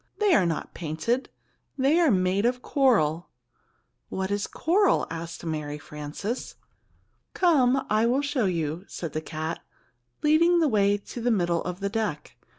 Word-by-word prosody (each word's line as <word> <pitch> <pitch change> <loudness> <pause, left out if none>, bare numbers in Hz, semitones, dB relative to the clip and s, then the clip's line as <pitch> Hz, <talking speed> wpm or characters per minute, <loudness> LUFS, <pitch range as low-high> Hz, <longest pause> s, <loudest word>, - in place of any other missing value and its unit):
"They 415 -3 +3
are 185 - +4
not 165 - -3
painted. 170 - -2 0.5
They 280 +5 +3
are 335 -3 +4
made 185 -1 +2
of 250 0 -2
coral." 180 - +2 0.8
"What 190 +1 -3
is 205 0 -1
coral?" 380 +4 +2
asked 165 0 -6
Mary 150 -2 -3
Frances. 150 - -6 0.8
"Come, 270 -7 +3
I 215 +2 +2
will 260 +4 +1
show 280 -5 0
you," 165 -2 -2
said 165 -4 -6
the 155 - -2
cat, 160 +1 -4 0.6
leading 330 +3 +4
the 320 - +3
way 205 -4 +3
to 220 +4 -9
the 245 - +1
middle 175 -6 +1
of 180 +1 -5
the 200 - -1
deck. 205 -9 -3
200 Hz, 155 wpm, -26 LUFS, 165-265 Hz, 0.8 s, are